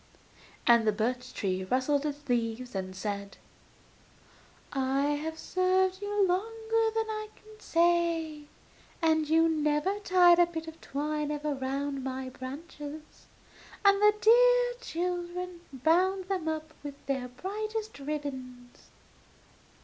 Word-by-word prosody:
And 235 -2 +5
the - - +5
birch 245 +4 -2 0.4
rustled 280 +3 +1
its 290 0 -6
leaves, 240 0 -1
and 185 -1 -4
said: 200 0 -4 1.4
'I 270 0 +1
have 295 +3 -1
served 370 +2 +1
you 410 -1 +1
longer 445 +4 0
than 445 0 +1
I 430 0 -4
can 430 0 -17
say, 335 -4 +1 0.5
and 315 -2 +2
you 325 +1 +5
never 310 +5 +1
tied 360 -3 +5
a 350 - +6
bit 325 -1 -6
of 320 0 -10
twine 300 +1 -2
even 295 -2 -2
round 275 +1 -2
my 260 0 -4
branches; 290 +3 -9 0.6
and 400 0 +6
the 420 0 +6
dear - - +5
children 355 -2 -3
bound 360 +8 +2
them 370 -5 -1
up 315 0 -3
with 290 -1 -7
their 265 -2 -2
brightest 425 - -5
ribbons. 265 -4 -6
315 Hz, 120 wpm, -29 LUFS, 270-370 Hz, 1.4 s, a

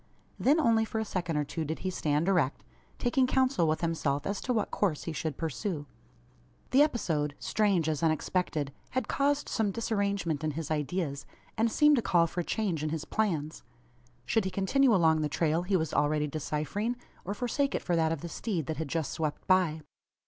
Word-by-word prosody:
Then 290 +5 +4
only 230 -6 +4
for 220 - -4
a 220 - 0
second 175 -6 -2
or 150 - +2
two 160 +3 -4
did 155 +1 -3
he 185 - 0
stand 155 -1 0
erect 175 -9 +1 0.3
taking 255 +1 +2
council 260 -9 +2
with 155 0 0
himself 155 -4 -1
as 200 0 -2
to 255 - -2
what 220 -4 0
course 180 -8 0
he 165 - -4
should 155 -2 -3
pursue. 160 - -3 0.9
The 270 - +6
episode 160 - +1
strange 200 -7 +1
as 155 -2 -1
unexpected 155 -2 0 0.2
had 255 - 0
caused 285 +1 +1
some 220 -3 0
disarrangement 200 -7 -1
in 155 -1 -1
his 160 -2 -4
ideas, 150 -1 -2 0.3
and 225 +1 +1
seemed 295 +2 +5
to - - +2
call 170 -5 +3
for 170 +2 -4
a - - +1
change 190 -6 -1
in 155 - -1
his 160 0 -3
plans. 160 -8 -1 0.6
Should 225 -4 +1
he - - 0
continue 220 +8 +3
along 160 -3 +4
the 150 - 0
trail 160 +2 +1
he 185 +2 +1
was 160 -3 -2
already 150 0 +2
deciphering; 155 - -2 0.3
or 200 +3 -4
forsake 265 +5 0
it - - -2
for 175 - 0
that 160 -1 +2
of 165 -3 -2
the 170 - -5
steed 170 - -3
that 155 +2 -3
had 160 -1 -3
just 160 0 -2
swept 155 -2 -3
by? 180 -5 +3
170 Hz, 200 wpm, -30 LUFS, 155-215 Hz, 0.9 s, The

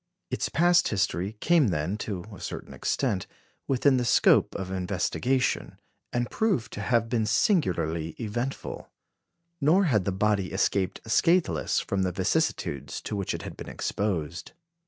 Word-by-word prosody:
Its - - -1
past 175 +1 +4
history 95 0 -1
came 170 -6 +4
then, 85 +1 -1
to 100 -4 -4
a - - -12
certain - - -6
extent, 105 -10 -1 0.4
within 135 0 +3
the 125 - +1
scope 120 - +4
of 95 -1 -4
investigation, 100 +8 -1 0.3
and 120 0 -1
proved 200 - 0
to 100 - -5
have 115 +1 +1
been 115 -1 0
singularly 85 - +1
eventful; 120 +4 -4 0.7
nor 165 +8 +4
had 115 - +2
the 100 - -1
body 100 -1 +1
escaped 95 0 0
scatheless 115 - +2
from 100 - -1
the 95 -1 +1
vicissitudes 70 -4 -1
to 105 - -5
which 100 -2 -2
it - - -6
had - - -7
been - - -8
exposed. 85 -6 -3
105 Hz, 145 wpm, -27 LUFS, 90-130 Hz, 0.7 s, past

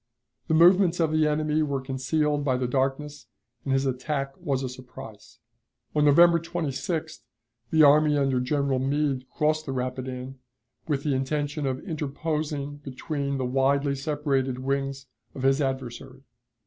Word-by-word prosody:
The 160 - +2
movements 175 +1 +5
of 160 -2 +2
the 155 -1 +3
enemy 155 +1 +1
were 140 -3 -1
concealed 145 +3 -1
by 130 -3 +1
the 125 - -1
darkness, 135 +3 -2 0.4
and 135 - -3
his 135 +1 +2
attack 135 +1 -2
was 135 -5 -1
a - - -1
surprise. 125 -4 -11 0.6
On 150 -1 +3
November 170 +3 +6
26th 160 -1 -3 0.5
the 160 -1 +5
army 150 +1 +5
under 135 -2 +1
General 135 +1 0
Meade 135 -1 -1
crossed 155 +1 0
the 135 - -2
Rapidan, 130 0 -5 0.5
with 140 -3 -1
the 145 - 0
intention 145 +2 -1
of 130 +5 -4
interposing 150 -2 -3
between 140 0 -4
the 130 - -2
widely 140 +2 +1
separated 135 -2 -1
wings 135 +1 -2 0.3
of 130 - -6
his 135 +2 +3
adversary. 130 0 -4
140 Hz, 145 wpm, -26 LUFS, 130-150 Hz, 0.6 s, November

